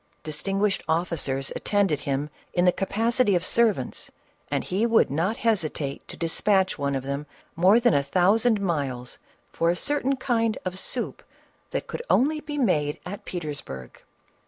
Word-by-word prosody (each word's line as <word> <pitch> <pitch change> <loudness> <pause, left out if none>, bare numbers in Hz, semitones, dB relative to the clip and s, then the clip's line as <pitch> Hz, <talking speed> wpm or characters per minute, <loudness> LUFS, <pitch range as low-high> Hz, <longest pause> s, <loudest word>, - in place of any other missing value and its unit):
Distin 155 +6 -3
guished 205 -1 +2
officers 160 -5 -1
attended 200 -8 +1
him 140 +1 -2 0.2
in 175 0 +2
the 180 - +6
capacity 225 +3 +1
of 175 0 0
ser 235 +2 +4
vants, - - -5 0.4
and - - 0
he 190 +4 -1
would 230 - +4
not 175 +10 0
hesitate 155 -10 -1
to - - -7
despatch 190 +3 +2
one 140 -1 0
of 135 - -2
them 140 +2 -4 0.3
more 190 +7 +5
than 240 -1 +3
a 140 - +4
thousand 200 - +3
miles 140 -10 -2 0.3
for 165 - +1
a 175 - +2
certain 275 +5 0
kind 230 -4 0
of 185 0 -2
soup - - -1 0.5
that - - -3
could - - -5
only 305 +5 +3
be 295 -1 -6
made 150 - +1
at 200 +3 -7
Petersburg. 145 - -6
180 Hz, 160 wpm, -25 LUFS, 150-225 Hz, 0.5 s, the